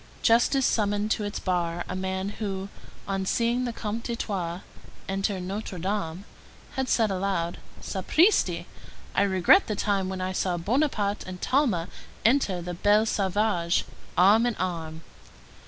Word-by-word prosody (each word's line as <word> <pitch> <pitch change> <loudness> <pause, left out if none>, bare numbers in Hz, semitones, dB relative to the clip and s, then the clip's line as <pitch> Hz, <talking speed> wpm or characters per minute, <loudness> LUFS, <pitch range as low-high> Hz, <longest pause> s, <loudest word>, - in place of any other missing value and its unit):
Justice 240 +3 +4
summoned 205 0 +1
to 215 - +1
its 205 - -4
bar 175 -2 -1
a - - -4
man 190 +1 -2
who, 195 -2 -4 0.4
on 195 -1 -1
seeing 240 +3 +1
the 240 - -2
Comte 225 0 -4
d'Artois 190 -7 -3 0.5
enter 195 0 -1
Notre 190 +1 -5
Dame, 185 0 -3 0.5
had 265 -1 -2
said 220 -3 +3
aloud: 185 -3 -1 0.2
_"Sapristi! 190 - +2 0.5
I - - +2
regret 190 - +5
the 215 - -1
time 195 -2 0
when 190 0 -4
I 185 0 -2
saw 185 -1 -1
Bonaparte 210 - 0
and 185 0 -7
Talma 230 - +1 0.4
enter 215 -8 +2
the 175 +1 -4
Bel 205 +5 +3
Sauvage, 195 -4 +1 0.3
arm 210 +6 +6
in 240 - -1
arm." 165 -3 -4
195 Hz, 140 wpm, -26 LUFS, 180-220 Hz, 0.5 s, arm